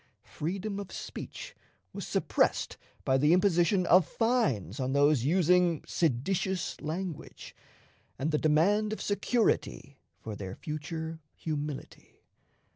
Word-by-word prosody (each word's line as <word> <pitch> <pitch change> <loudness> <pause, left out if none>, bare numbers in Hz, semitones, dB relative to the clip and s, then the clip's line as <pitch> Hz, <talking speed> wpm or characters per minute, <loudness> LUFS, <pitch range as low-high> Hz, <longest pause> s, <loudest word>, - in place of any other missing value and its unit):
Freedom 195 +6 -4
of 200 -2 -7
speech - - -7 0.4
was - - -6
suppressed - - +1 0.3
by 130 -1 +3
the 150 +4 +5
imposition 180 0 +3
of 175 -1 +5
fines 190 - 0
on 130 0 -1
those 140 -3 +4
using 175 0 +3
"seditious" 175 +5 -1
language, 165 +2 -5 0.6
and 145 +5 -1
the 150 - +1
demand 200 +8 +3
of - - -5
security 205 - 0 0.2
for 110 -2 -6
their 95 -2 -6
future 160 +1 -5 0.2
humility. 150 -2 -6
165 Hz, 115 wpm, -30 LUFS, 145-190 Hz, 0.6 s, the